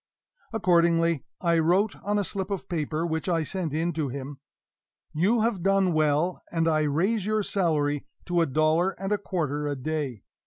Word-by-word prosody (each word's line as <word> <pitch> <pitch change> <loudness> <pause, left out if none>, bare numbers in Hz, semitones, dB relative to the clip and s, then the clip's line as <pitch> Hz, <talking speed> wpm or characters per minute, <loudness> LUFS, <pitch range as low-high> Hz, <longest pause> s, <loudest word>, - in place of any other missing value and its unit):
Accordingly, 170 -6 +3 0.2
I 170 -2 +3
wrote 185 +6 +2
on 205 +1 0
a 205 - +1
slip 190 +1 -3
of 195 -3 -4
paper, 160 -1 -2
which 160 +2 -2
I 165 -2 +1
sent 170 0 -3
in 165 +3 -1
to 150 -3 -2
him: 135 +2 -7 0.7
"You 205 +9 +2
have 220 -5 0
done 195 -1 +2
well, 155 +3 +1
and 165 -1 +1
I 155 -1 +3
raise 195 +8 0
your 215 -1 +1
salary 150 -8 0 0.2
to 175 -1 +1
a 165 - +2
dollar 155 +6 +1
and 195 +1 -3
a 210 - +2
quarter 150 -7 -2
a 145 - -1
day. 135 -5 -3
170 Hz, 180 wpm, -26 LUFS, 155-190 Hz, 0.7 s, Accordingly